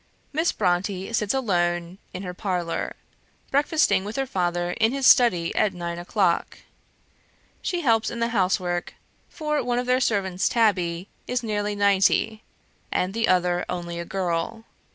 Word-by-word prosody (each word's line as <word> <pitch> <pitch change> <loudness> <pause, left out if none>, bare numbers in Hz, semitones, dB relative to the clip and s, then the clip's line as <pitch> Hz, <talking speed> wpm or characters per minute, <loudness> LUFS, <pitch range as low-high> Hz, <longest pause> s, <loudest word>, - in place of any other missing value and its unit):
Miss 320 +3 +2
Brontë 190 +2 -1
sits 210 -2 +1
alone 175 -7 0
in 185 - -6
her 180 -1 -5
parlour; 180 -3 -2 0.6
breakfasting 285 - +3
with 210 +2 -6
her 270 - 0
father 175 -5 -1
in 225 +4 +1
his 275 -1 -1
study 180 -12 +5
at 205 -3 +1
nine 170 -1 -4
o'clock. 175 -1 0 1.0
She 355 -1 -2
helps 225 -6 +2
in 235 - -6
the 230 0 +1
housework; 180 -4 0 0.3
for 300 -2 -1
one 245 0 0
of 250 - -1
their 250 +1 +2
servants, 190 -6 +1
Tabby, 185 -6 +1 0.2
is 250 0 -1
nearly 210 -2 -1
ninety, 200 +2 +2 0.5
and 185 +1 0
the 225 +1 0
other 180 -1 +2
only 175 -1 -4
a - - -3
girl. 190 +4 -2
195 Hz, 150 wpm, -24 LUFS, 175-230 Hz, 1.0 s, study